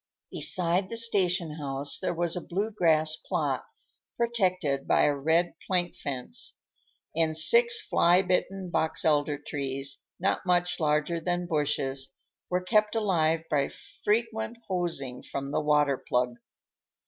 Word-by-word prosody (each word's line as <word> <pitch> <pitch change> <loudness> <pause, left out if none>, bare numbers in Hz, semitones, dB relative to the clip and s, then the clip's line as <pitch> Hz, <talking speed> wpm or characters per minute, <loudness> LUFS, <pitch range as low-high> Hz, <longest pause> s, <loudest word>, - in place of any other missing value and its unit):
Beside 180 0 +1
the 230 - -2
station 180 -8 +2
house 140 -1 -1
there - - -1
was 170 0 0
a 180 - -3
blue 200 +7 -2
grass 160 -5 +2
plot, - - -2 0.5
protected 185 - 0
by - - +4
a 145 - +3
red 160 +5 +1
plank 180 -2 0
fence, 130 -3 -6 0.6
and 160 -1 +3
six 470 - +5
fly 175 - +3
bitten 185 0 -1
box 160 - 0
elder 150 -1 +2
trees, 135 -1 -4 0.2
not - - 0
much 180 -1 +1
larger 150 +2 +1
than 175 +1 -1
bushes, 145 -3 -1 0.3
were 180 0 0
kept 215 +2 +2
alive 165 -7 +1
by 140 -3 +1 0.3
frequent 225 +1 0
hosings 165 -9 -3
from 140 0 -5
the 150 - 0
water 150 -2 +2
plug. 125 -1 -1
170 Hz, 135 wpm, -28 LUFS, 145-185 Hz, 0.6 s, six